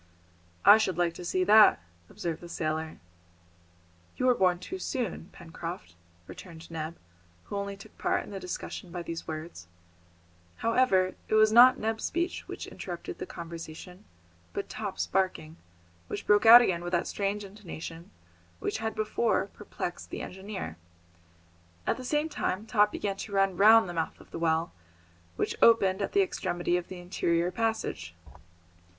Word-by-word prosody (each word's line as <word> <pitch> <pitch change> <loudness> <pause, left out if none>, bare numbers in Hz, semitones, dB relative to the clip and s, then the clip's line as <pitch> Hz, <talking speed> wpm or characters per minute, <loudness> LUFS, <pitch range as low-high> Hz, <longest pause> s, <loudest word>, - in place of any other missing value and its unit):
"I 210 +2 +9
should 190 -6 0
like 175 -1 +1
to 175 - -9
see 185 +1 0
that," 210 +2 +7 0.3
observed 165 -2 -4
the 175 - -10
sailor. 155 -1 -3 1.2
"You 255 - 0
were 255 - +6
born 185 -5 +2
too 365 - -7
soon, 240 - -3
Pencroft," 165 - -8 0.3
returned 165 - -11
Neb, 160 +1 -5 0.5
who - - -7
only 200 0 -4
took 210 +2 -14
part - - 0
in - - -11
the 195 - -5
discussion 180 0 -6
by 175 -1 -5
these 165 -1 -6
words. 155 - -7 0.9
However, 230 -6 +2
it - - +1
was 215 0 +6
not 250 +3 +8
Neb's 220 0 -2
speech 345 +2 -2
which - - -6
interrupted - - -7
the 375 - -5
conversation, 170 - -9 0.5
but 200 - -4
Top's 205 -3 -3
barking, 180 -4 -1 0.5
which - - -5
broke 210 +2 +4
out 240 +2 +11
again 175 -5 0
with 175 +1 -5
that 175 - +2
strange 205 +1 -2
intonation 175 -4 -9 0.5
which 150 - -3
had 220 -1 -3
before 215 -2 0
perplexed 180 -3 -6
the - - -5
engineer. 190 - -7 1.1
At - - 0
the 255 - -7
same 295 +4 0
time 210 -9 -2
Top 210 -2 +3
began 200 -1 -3
to 200 - -7
run 195 -1 +2
round 215 +2 +7
the 175 - -5
mouth 165 -1 -3
of - - -17
the - - -6
well, 165 0 +1 0.6
which - - -1
opened 200 -4 +5
at 200 - -2
the 400 0 +5
extremity 175 - -1
of 180 -1 -2
the 185 - -8
interior 175 -1 0
passage. 220 - -2
190 Hz, 160 wpm, -29 LUFS, 170-215 Hz, 1.2 s, out